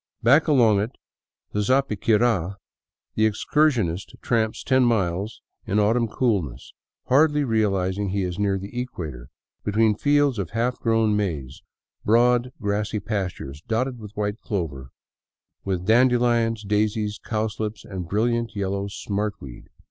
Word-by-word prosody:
Back 140 +9 +5
along 120 -9 +4
it 105 +4 -3 0.6
to 105 - 0
Zapiquira 110 -5 +1 0.6
the 110 0 +3
excursionist 110 - 0
tramps 110 -2 0
ten 130 -1 +3
miles 100 -3 0 0.2
in 100 - 0
autumn 115 +3 +2
coolness, 95 - -1 0.3
hardly 150 +2 +4
realizing 100 -4 0
he 100 +1 -1
is 90 0 -4
near 100 -1 +1
the 100 +6 -5
equator, 75 - -7 0.3
between 110 +1 +3
fields 145 -1 +2
of 90 -5 -3
half 120 +3 -1
grown 115 -2 +2
maize, 80 -6 -3 0.4
broad 120 +2 +3
grassy 105 +1 -1
pastures 95 -10 -4
dotted 120 +5 -2
with 105 -1 -11
white 105 +1 -2
clover, 75 - -4 0.8
with 95 -2 -2
dandelions, 120 -1 +3
daisies, 105 +1 0
cowslips, 110 -2 -3
and 90 -4 -6
brilliant 115 +3 0
yellow 100 0 -2
" - - -7 0.2
smart 105 0 -1
weed." 65 -3 -11
105 Hz, 130 wpm, -24 LUFS, 100-120 Hz, 0.8 s, Back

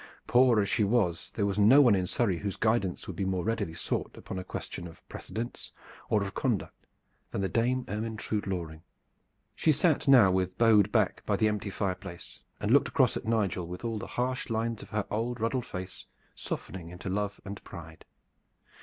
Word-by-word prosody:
Poor 125 -2 +5
as 100 - +2
she 105 - +2
was, 100 -6 +1
there 100 - +1
was 100 0 -1
no 110 +8 +7
one 125 -6 +7
in 95 -2 +1
Surrey 95 -7 0
whose 100 -2 -3
guidance 110 -5 0
would 95 - -6
be 95 - -2
more 95 -2 -1
readily 105 -7 -2
sought 85 - -3
upon 95 - -6
a - - -5
question 90 -1 -6
of 80 - -15
precedence 115 +2 -6 0.4
or 105 -2 +2
of 100 0 -5
conduct 120 -7 -2 0.4
than - - -3
the 95 - +1
Dame 120 +6 +1
Ermyntrude 105 -1 -3
Loring. 85 -4 -4 0.7
She 160 - +3
sat 155 0 +2
now 125 -8 +7
with 90 0 0
bowed 110 -3 +5
back 110 -5 +2
by 105 - +2
the 110 +2 +3
empty 105 -1 -2
fireplace, 95 -2 -5 0.2
and - - -1
looked - - +5
across - - +2
at - - -4
Nigel 100 -6 0
with 90 +6 -7
all 115 -2 -2
the - - -6
harsh 125 +1 -2
lines 115 0 -1
of - - -11
her 105 -2 -1
old 115 +3 -2
ruddled 115 +3 -1
face 90 0 -7 0.3
softening 85 -2 -6
into 90 +2 -8
love 100 +2 -2
and 100 0 -7
pride. 80 -1 -10
105 Hz, 190 wpm, -29 LUFS, 95-115 Hz, 0.7 s, no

